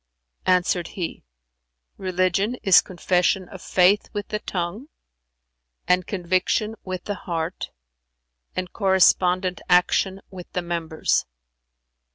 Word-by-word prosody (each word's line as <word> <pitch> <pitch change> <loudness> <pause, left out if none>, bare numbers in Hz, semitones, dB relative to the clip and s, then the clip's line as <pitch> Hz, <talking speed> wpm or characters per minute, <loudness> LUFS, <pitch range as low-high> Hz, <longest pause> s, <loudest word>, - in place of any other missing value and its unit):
Answered 180 -1 +2
he, 175 -3 -4 0.7
"Religion 185 +4 0
is 195 -4 +7
confession 180 +1 0
of 190 -1 -11
Faith 190 +3 +3
with 205 -1 -4
the 210 - -2
tongue 190 +7 -4 1.0
and 180 0 +2
conviction 185 +3 0
with 185 -1 -5
the 205 - -3 0.2
heart 165 +1 -3 0.9
and 185 -1 -4
correspondent 185 -2 +3
action 185 +2 +3
with 180 -2 -10
the 180 - -2
members. 165 - -1
185 Hz, 105 wpm, -23 LUFS, 175-195 Hz, 1.0 s, is